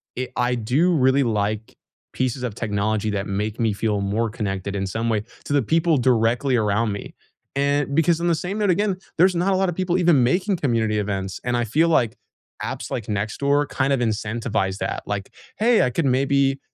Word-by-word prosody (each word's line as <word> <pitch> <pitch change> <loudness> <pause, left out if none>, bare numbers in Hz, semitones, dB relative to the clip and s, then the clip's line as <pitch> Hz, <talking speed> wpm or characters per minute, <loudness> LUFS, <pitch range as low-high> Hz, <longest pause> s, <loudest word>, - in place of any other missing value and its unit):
it 130 0 -4
I 125 0 +1
do 130 +10 +2
really 135 -2 +3
like 110 -1 -2 0.4
pieces 130 0 -2
of 120 -4 -2
technology 110 -1 -1
that 100 -1 -2
make 105 +3 -3
me 110 -3 +1
feel 105 -1 -1
more 110 +4 0
connected 100 -3 -4
in 95 -1 -1
some 115 +4 -2
way 105 -2 0 0.2
to 145 - -2
the 145 - +4
people 165 +5 +2
directly 125 +1 +2
around 105 0 +1
me, 100 - -7 0.4
and 140 0 +1
because, 165 +1 +3
on 175 - 0
the 170 - +3
same 180 +5 -4
note, 205 - +1
again, 195 +1 +1 0.2
there's 180 +2 +4
not 185 +3 +1
a - - +2
lot 190 0 +1
of 175 - -3
people 185 -1 0
even 170 -6 +4
making 185 - +1
community 115 -7 0
events, 95 -2 -3
and 120 0 0
I 120 - +1
feel 155 +10 +2
like 120 -8 +2 0.5
apps - - -4
like 115 - -3
Nextdoor 135 +8 0
kinda 135 0 +1
incentivize 110 -4 -1
that. - - -3
Like, 100 -1 -4 0.3
"Hey, 230 +1 +4
I - - +2
could 165 +4 -1
maybe" 135 +1 +2
125 Hz, 195 wpm, -22 LUFS, 105-150 Hz, 0.5 s, the